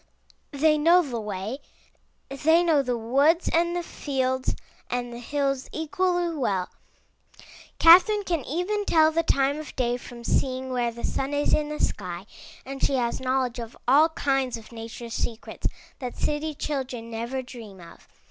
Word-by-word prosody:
They 305 Hz, +1 st, +3 dB
know 345 Hz, +4 st, +6 dB
the 245 Hz, -6 st, -4 dB
way; 210 Hz, +5 st, -4 dB, 0.7 s
they 320 Hz, +5 st, +3 dB
know 320 Hz, -4 st, +4 dB
the 250 Hz, -3 st, -1 dB
woods 280 Hz, +9 st, +2 dB
and 340 Hz, +1 st, +2 dB
the 350 Hz, -, -1 dB
fields 260 Hz, -4 st, -1 dB, 0.3 s
and 245 Hz, -1 st, -3 dB
the 235 Hz, -, -7 dB
hills 275 Hz, +1 st, -1 dB
equally 350 Hz, +2 st, 0 dB
well. 195 Hz, -10 st, -1 dB, 1.1 s
Catherine 375 Hz, +5 st, +7 dB
can 335 Hz, -7 st, -1 dB
even 365 Hz, +7 st, -1 dB
tell 315 Hz, -3 st, +5 dB
the 330 Hz, +1 st, +2 dB
time 280 Hz, -2 st, +1 dB
of 310 Hz, -, -9 dB
day 245 Hz, -1 st, 0 dB
from 240 Hz, -1 st, -11 dB
seeing 260 Hz, +1 st, 0 dB
where 240 Hz, -2 st, 0 dB
the 235 Hz, +1 st, -10 dB
sun 275 Hz, +2 st, -1 dB
is 290 Hz, -, +1 dB
in 300 Hz, -1 st, +2 dB
the 300 Hz, -, -5 dB
sky, 180 Hz, -1 st, -2 dB, 0.4 s
and 270 Hz, 0 st, -7 dB
she 275 Hz, -, +2 dB
has 240 Hz, -2 st, 0 dB
knowledge 255 Hz, -2 st, 0 dB
of 230 Hz, 0 st, -7 dB
all 295 Hz, +6 st, +6 dB
kinds 270 Hz, -5 st, 0 dB
of 225 Hz, 0 st, -14 dB
nature's 230 Hz, 0 st, -8 dB
secrets 230 Hz, -1 st, -3 dB, 0.3 s
that 250 Hz, -3 st, -6 dB
city 300 Hz, +1 st, -1 dB
children 255 Hz, -6 st, -4 dB
never 235 Hz, +4 st, -3 dB
dream 225 Hz, -6 st, -11 dB
of. 170 Hz, -1 st, -14 dB
270 Hz, 160 wpm, -26 LUFS, 240-310 Hz, 1.1 s, Catherine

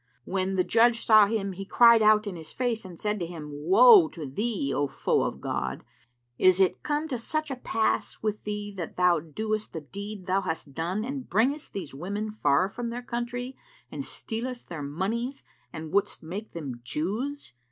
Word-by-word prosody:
When 190 Hz, 0 st, -1 dB
the 185 Hz, -, +3 dB
judge 230 Hz, +2 st, +3 dB
saw 215 Hz, -2 st, +7 dB
him, 200 Hz, -2 st, -1 dB
he 190 Hz, +1 st, -6 dB
cried 235 Hz, +3 st, +6 dB
out 215 Hz, 0 st, +5 dB
in 200 Hz, -3 st, -4 dB
his 160 Hz, -2 st, -9 dB
face 240 Hz, -4 st, -2 dB
and 175 Hz, -3 st, -10 dB
said 210 Hz, 0 st, -1 dB
to 170 Hz, -, -3 dB
him, 160 Hz, -4 st, -8 dB
"Woe 315 Hz, -, +7 dB
to 160 Hz, -4 st, -7 dB
thee, 140 Hz, -, -2 dB
O 145 Hz, -, +1 dB
foe 135 Hz, -, 0 dB
of -, -, -2 dB
God, 65 Hz, 0 st, -3 dB, 0.6 s
is 185 Hz, 0 st, +5 dB
it 190 Hz, -2 st, +2 dB
come 300 Hz, +1 st, -1 dB
to 250 Hz, -4 st, -2 dB
such 310 Hz, +5 st, -2 dB
a -, -, -2 dB
pass 225 Hz, -3 st, -1 dB
with 215 Hz, -1 st, -2 dB
thee 210 Hz, 0 st, -4 dB
that 170 Hz, -3 st, -6 dB
thou 180 Hz, -2 st, +4 dB
doest 215 Hz, +7 st, -3 dB
the 160 Hz, -, -4 dB
deed 200 Hz, +5 st, -8 dB
thou 190 Hz, +2 st, +1 dB
hast 160 Hz, -5 st, -4 dB
done 180 Hz, +8 st, -2 dB
and 265 Hz, 0 st, -5 dB
bringest 260 Hz, -, +1 dB
these 175 Hz, -8 st, -6 dB
women 200 Hz, +9 st, -4 dB
far 165 Hz, -4 st, +2 dB
from 235 Hz, +4 st, -5 dB
their 245 Hz, +1 st, -5 dB
country 245 Hz, +1 st, -4 dB, 0.4 s
and -, -, -4 dB
stealest 240 Hz, +2 st, -5 dB
their 165 Hz, -4 st, -5 dB
monies 210 Hz, -, -3 dB, 0.3 s
and 160 Hz, -1 st, -7 dB
wouldst 200 Hz, -2 st, +1 dB
make 195 Hz, +7 st, -7 dB
them 135 Hz, -8 st, -6 dB
Jews? 215 Hz, -, -3 dB
205 Hz, 190 wpm, -27 LUFS, 170-235 Hz, 0.6 s, saw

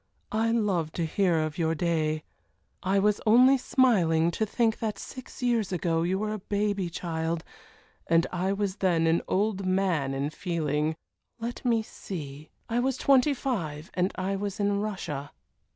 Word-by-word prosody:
I 225 Hz, +1 st, +1 dB
love 195 Hz, -9 st, +1 dB
to 170 Hz, -, -1 dB
hear 175 Hz, +1 st, +2 dB
of 155 Hz, +2 st, -2 dB
your 165 Hz, -1 st, +1 dB
day. 155 Hz, -2 st, 0 dB, 0.6 s
I 190 Hz, +2 st, +1 dB
was 205 Hz, +1 st, +2 dB
only 250 Hz, +5 st, +7 dB
smiling 175 Hz, -, +3 dB
to 220 Hz, +5 st, -1 dB
think 225 Hz, 0 st, +1 dB
that 215 Hz, -2 st, -2 dB
six 255 Hz, -1 st, -9 dB
years 230 Hz, -5 st, +1 dB
ago 165 Hz, -2 st, 0 dB
you 180 Hz, +3 st, +1 dB
were 215 Hz, +1 st, -2 dB
a 215 Hz, -, -4 dB
baby 200 Hz, -2 st, -1 dB
child, 165 Hz, -1 st, -3 dB, 0.6 s
and 165 Hz, 0 st, +4 dB
I 185 Hz, +2 st, 0 dB
was 200 Hz, -1 st, -1 dB
then 170 Hz, -4 st, +2 dB
an 165 Hz, +1 st, +3 dB
old 195 Hz, 0 st, 0 dB
man 185 Hz, -8 st, +1 dB
in 140 Hz, +2 st, -1 dB
feeling 155 Hz, -2 st, -1 dB, 0.4 s
let 235 Hz, +1 st, -5 dB
me 230 Hz, -3 st, +2 dB
see, 150 Hz, -8 st, -8 dB, 0.2 s
I 235 Hz, +1 st, 0 dB
was 260 Hz, +1 st, 0 dB
twenty 275 Hz, +1 st, +4 dB
five, 170 Hz, -, -3 dB
and 180 Hz, +1 st, +1 dB
I 190 Hz, +1 st, -1 dB
was 200 Hz, 0 st, -4 dB
in 200 Hz, 0 st, +1 dB
Russia." 185 Hz, -9 st, -4 dB
190 Hz, 165 wpm, -28 LUFS, 165-215 Hz, 0.6 s, only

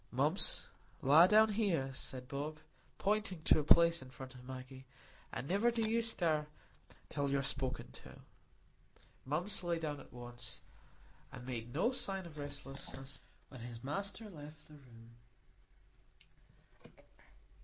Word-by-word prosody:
"Mumps, -, -, +2 dB, 0.4 s
lie 155 Hz, +6 st, +8 dB
down 215 Hz, +1 st, +6 dB
there," 165 Hz, -12 st, +1 dB
said 130 Hz, -1 st, -3 dB
Bob, 145 Hz, +3 st, -4 dB, 0.4 s
pointing 205 Hz, -5 st, 0 dB
to -, -, +5 dB
a -, -, 0 dB
place 170 Hz, +2 st, +6 dB
in 130 Hz, -, -10 dB
front 130 Hz, +1 st, -9 dB
of 125 Hz, -1 st, -12 dB
Maggie, 130 Hz, +1 st, -9 dB, 0.4 s
"and 135 Hz, -, -4 dB
niver 200 Hz, +7 st, +3 dB
do 230 Hz, -2 st, 0 dB
you 230 Hz, +1 st, +2 dB
stir 165 Hz, -9 st, +1 dB, 0.6 s
till 140 Hz, -1 st, -1 dB
you're 140 Hz, 0 st, +1 dB
spoke 130 Hz, -1 st, +2 dB
to." -, -, -12 dB, 1.1 s
Mumps 170 Hz, +9 st, 0 dB
lay 170 Hz, -1 st, 0 dB
down 150 Hz, -3 st, -3 dB
at -, -, -14 dB
once, 120 Hz, 0 st, -9 dB, 0.7 s
and 125 Hz, -1 st, -9 dB
made 120 Hz, -2 st, -4 dB
no 170 Hz, -, +2 dB
sign 195 Hz, -7 st, -1 dB
of 155 Hz, -3 st, -10 dB
restlessness 135 Hz, -2 st, -7 dB, 0.3 s
when 130 Hz, -, -10 dB
his 120 Hz, 0 st, -7 dB
master 200 Hz, +9 st, -2 dB
left 150 Hz, -4 st, -11 dB
the 155 Hz, -, -15 dB
room. 115 Hz, -5 st, -16 dB
145 Hz, 135 wpm, -36 LUFS, 130-180 Hz, 1.1 s, lie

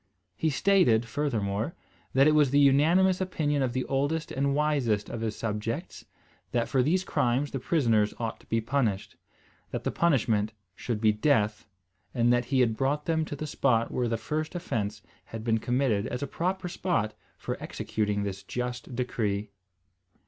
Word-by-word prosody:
He 160 Hz, -, 0 dB
stated, 145 Hz, -, +3 dB
furthermore, 115 Hz, -2 st, -2 dB, 0.4 s
that 135 Hz, +1 st, +5 dB
it -, -, +6 dB
was 150 Hz, -3 st, +4 dB
the 140 Hz, -, +2 dB
unanimous 165 Hz, +7 st, +4 dB
opinion 150 Hz, -6 st, 0 dB
of 130 Hz, -2 st, +1 dB
the 130 Hz, 0 st, -1 dB
oldest 145 Hz, +4 st, -1 dB
and 140 Hz, +1 st, 0 dB
wisest 140 Hz, -9 st, +1 dB
of 115 Hz, -, -4 dB
his 110 Hz, -2 st, -2 dB
subjects, 115 Hz, -, -4 dB, 0.5 s
that 120 Hz, -1 st, +1 dB
for 130 Hz, -, +2 dB
these 175 Hz, +8 st, +2 dB
crimes 130 Hz, -3 st, 0 dB
the 135 Hz, -, -3 dB
prisoners 115 Hz, -8 st, +2 dB
ought 115 Hz, -2 st, -4 dB
to -, -, -22 dB
be 115 Hz, 0 st, 0 dB
punished, 115 Hz, -5 st, -1 dB, 0.5 s
that -, -, -4 dB
the -, -, -1 dB
punishment 110 Hz, -10 st, +1 dB, 0.2 s
should 110 Hz, 0 st, -3 dB
be 110 Hz, -1 st, +5 dB
death; 105 Hz, -2 st, +1 dB, 0.5 s
and 120 Hz, 0 st, +4 dB
that 120 Hz, 0 st, +1 dB
he 130 Hz, +1 st, +2 dB
had 115 Hz, -3 st, +2 dB
brought 140 Hz, +4 st, 0 dB
them 160 Hz, -1 st, +1 dB
to 145 Hz, -, -5 dB
the 155 Hz, -, -5 dB
spot 120 Hz, -6 st, +1 dB
where 125 Hz, -1 st, 0 dB
the 115 Hz, 0 st, 0 dB
first 155 Hz, -, -3 dB
offence 105 Hz, -, -3 dB, 0.2 s
had 115 Hz, -1 st, -7 dB
been 115 Hz, -1 st, +1 dB
committed 120 Hz, -3 st, +1 dB
as 125 Hz, -, -4 dB
a -, -, -2 dB
proper 185 Hz, +5 st, -2 dB
spot 170 Hz, -, -1 dB, 0.2 s
for -, -, -4 dB
executing 105 Hz, -1 st, -2 dB
this 100 Hz, -1 st, -4 dB
just 125 Hz, 0 st, -5 dB
decree. 105 Hz, -4 st, -2 dB
125 Hz, 170 wpm, -28 LUFS, 110-150 Hz, 0.5 s, it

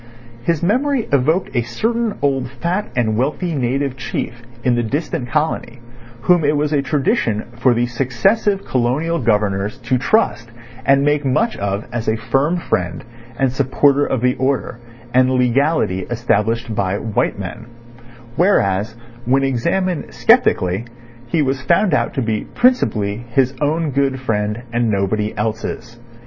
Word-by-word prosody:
His 165 Hz, +5 st, -1 dB
memory 255 Hz, +6 st, +1 dB
evoked 150 Hz, +7 st, +1 dB
a 120 Hz, -, +3 dB
certain 225 Hz, -, -1 dB
old 135 Hz, -3 st, +1 dB
fat 175 Hz, +9 st, -2 dB
and 110 Hz, -3 st, +1 dB
wealthy 150 Hz, -, -1 dB
native 135 Hz, 0 st, -1 dB
chief 120 Hz, -2 st, -5 dB, 0.2 s
in 125 Hz, -, +3 dB
the 120 Hz, -, +1 dB
distant 140 Hz, +2 st, -3 dB
colony 150 Hz, -5 st, -1 dB, 0.4 s
whom 175 Hz, +4 st, +3 dB
it 145 Hz, +1 st, +2 dB
was 150 Hz, +1 st, 0 dB
a 145 Hz, -, +2 dB
tradition 135 Hz, -, 0 dB
for 120 Hz, 0 st, +3 dB
the 120 Hz, +1 st, +2 dB
successive 135 Hz, -, 0 dB
Colonial 135 Hz, +7 st, 0 dB
Governors 105 Hz, -3 st, 0 dB
to 125 Hz, +2 st, 0 dB
trust 120 Hz, -, +1 dB, 0.4 s
and 140 Hz, 0 st, +5 dB
make 145 Hz, 0 st, +2 dB
much 215 Hz, -, +1 dB
of 100 Hz, +1 st, -2 dB
as 120 Hz, -2 st, -3 dB
a 110 Hz, -, +1 dB
firm 135 Hz, +9 st, 0 dB
friend 90 Hz, -, -2 dB, 0.3 s
and 135 Hz, -2 st, +1 dB
supporter 140 Hz, +2 st, +2 dB
of 130 Hz, -4 st, -1 dB
the 125 Hz, 0 st, +3 dB
order 130 Hz, -2 st, -1 dB, 0.3 s
and 130 Hz, 0 st, +4 dB
legality 130 Hz, -, +2 dB
established 115 Hz, -1 st, 0 dB
by 100 Hz, -1 st, 0 dB
white 110 Hz, -2 st, -1 dB
men; 100 Hz, +4 st, -7 dB, 0.7 s
whereas, 110 Hz, -, +2 dB, 0.3 s
when 135 Hz, +3 st, +2 dB
examined 170 Hz, +8 st, -1 dB
sceptically, 90 Hz, +3 st, +3 dB, 0.4 s
he 150 Hz, +5 st, +1 dB
was 135 Hz, -1 st, -1 dB
found 170 Hz, +6 st, +2 dB
out -, -, 0 dB
to 130 Hz, -, 0 dB
be 110 Hz, -2 st, -2 dB
principally 115 Hz, -, +2 dB
his 130 Hz, +2 st, +2 dB
own 155 Hz, +1 st, 0 dB
good 135 Hz, 0 st, 0 dB
friend, 105 Hz, -2 st, -2 dB
and 120 Hz, -1 st, +1 dB
nobody 105 Hz, +1 st, 0 dB
else's. 115 Hz, +2 st, -4 dB
130 Hz, 145 wpm, -19 LUFS, 115-150 Hz, 0.7 s, and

